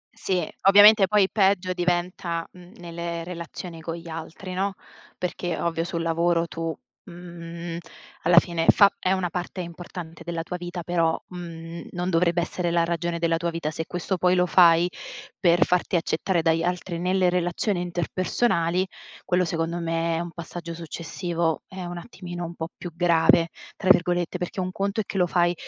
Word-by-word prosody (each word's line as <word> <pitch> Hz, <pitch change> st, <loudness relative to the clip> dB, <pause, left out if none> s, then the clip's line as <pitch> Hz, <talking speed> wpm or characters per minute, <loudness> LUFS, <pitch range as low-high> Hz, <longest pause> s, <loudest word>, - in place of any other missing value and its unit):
Sì. 180 Hz, -4 st, -1 dB, 0.2 s
Ovviamente, 205 Hz, 0 st, +8 dB
poi 205 Hz, -1 st, +4 dB
peggio 190 Hz, -3 st, +2 dB
diventa, 175 Hz, -1 st, -1 dB
mhmm, 180 Hz, 0 st, -15 dB
nelle 170 Hz, -1 st, -5 dB
relazioni 170 Hz, -1 st, -7 dB
con 165 Hz, +1 st, -4 dB
gli 170 Hz, 0 st, -10 dB
altri, 165 Hz, +3 st, -7 dB
no, 195 Hz, +1 st, -1 dB, 0.4 s
perché 175 Hz, -1 st, -3 dB
ovvio, 165 Hz, -1 st, 0 dB
sul 170 Hz, -1 st, -3 dB
lavoro 170 Hz, +1 st, +2 dB
tu, 165 Hz, -1 st, -3 dB, 0.3 s
mhmm, 170 Hz, -1 st, -8 dB, 0.4 s
alla 170 Hz, +1 st, +4 dB
fine 170 Hz, -1 st, +4 dB
fa 200 Hz, -1 st, +7 dB
è 185 Hz, -, 0 dB
una 185 Hz, -2 st, 0 dB
parte 180 Hz, +1 st, -4 dB
importante 170 Hz, -1 st, -8 dB
della 165 Hz, 0 st, -3 dB
tua 180 Hz, +1 st, -5 dB
vita, 175 Hz, 0 st, -6 dB
però, 165 Hz, -2 st, +1 dB
mhmm, 170 Hz, -2 st, -8 dB
non 180 Hz, +1 st, -2 dB
dovrebbe 170 Hz, 0 st, +2 dB
essere 175 Hz, 0 st, -2 dB
la 170 Hz, 0 st, +2 dB
ragione 170 Hz, 0 st, -1 dB
della 165 Hz, 0 st, +1 dB
tua 170 Hz, 0 st, -1 dB
vita. 165 Hz, -2 st, -3 dB
Se 160 Hz, +1 st, -4 dB
questo 180 Hz, +1 st, -2 dB
poi 180 Hz, +1 st, +3 dB
lo 180 Hz, -, +3 dB
fai 170 Hz, -1 st, +6 dB, 0.5 s
per 175 Hz, -2 st, +4 dB
farti 180 Hz, +1 st, +1 dB
accettare 170 Hz, +1 st, 0 dB
dagli 165 Hz, 0 st, +3 dB
altri 175 Hz, 0 st, -2 dB
nelle 185 Hz, +1 st, +2 dB
relazioni 175 Hz, +2 st, 0 dB
interpersonali, 180 Hz, +1 st, 0 dB, 0.4 s
quello 180 Hz, 0 st, +2 dB
secondo 165 Hz, +1 st, -2 dB
me 165 Hz, 0 st, 0 dB
è -, -, -1 dB
un 170 Hz, 0 st, -4 dB
passaggio 170 Hz, 0 st, -7 dB
successivo, 165 Hz, 0 st, -3 dB
è 185 Hz, -1 st, -7 dB
un 175 Hz, 0 st, -5 dB
attimino 175 Hz, -2 st, -7 dB
un 170 Hz, -, -6 dB
po' 160 Hz, -1 st, -5 dB
più 175 Hz, -, -7 dB
"grave", 170 Hz, -1 st, +4 dB, 0.3 s
tra 190 Hz, -, -2 dB
virgolette, 175 Hz, -1 st, +3 dB
perché 180 Hz, +2 st, -4 dB
un 185 Hz, 0 st, -1 dB
conto 200 Hz, +3 st, -2 dB
è -, -, -7 dB
che 195 Hz, -, -5 dB
lo 180 Hz, -, +4 dB
fai, 175 Hz, 0 st, +2 dB
175 Hz, 175 wpm, -25 LUFS, 165-180 Hz, 0.5 s, Ovviamente